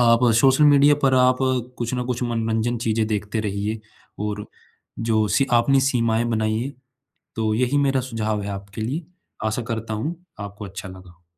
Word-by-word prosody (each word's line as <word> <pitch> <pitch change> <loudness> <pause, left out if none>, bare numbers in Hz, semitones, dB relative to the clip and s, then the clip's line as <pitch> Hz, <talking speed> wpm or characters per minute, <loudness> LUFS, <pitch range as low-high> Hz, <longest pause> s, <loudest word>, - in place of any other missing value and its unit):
आप 115 0 +5 0.2
social 135 +3 +5
media 145 0 +6
पर 135 -1 +4
आप 125 0 +4 0.4
कुछ 120 +1 -2
न 125 0 -2
कुछ 125 0 -2
मनोरंजन 115 0 -1
चीज़ें 110 0 +1
देखते 105 +1 -2
रहिए 105 +1 -3 0.4
और 105 0 -3 0.7
जो 110 -1 +3
सी 135 - +3
आपनी 135 +3 +4
सीमाएँ 115 -2 +1
बनाइए। 110 +3 -1 0.6
तो 110 -1 0
यही 125 +5 +1
मेरा 135 -2 +2
सुझाव 110 -2 -1
है 100 - -4
आपके 100 +2 -7
लिए। 145 +9 -3 0.4
आशा 110 +3 -1
करता 115 -1 -3
हूँ 150 +11 -3 0.2
आपको 100 +1 -7
अच्छा 95 +1 -8
लगा 95 -1 -12
हो। 85 0 -23
115 Hz, 170 wpm, -23 LUFS, 105-125 Hz, 0.7 s, media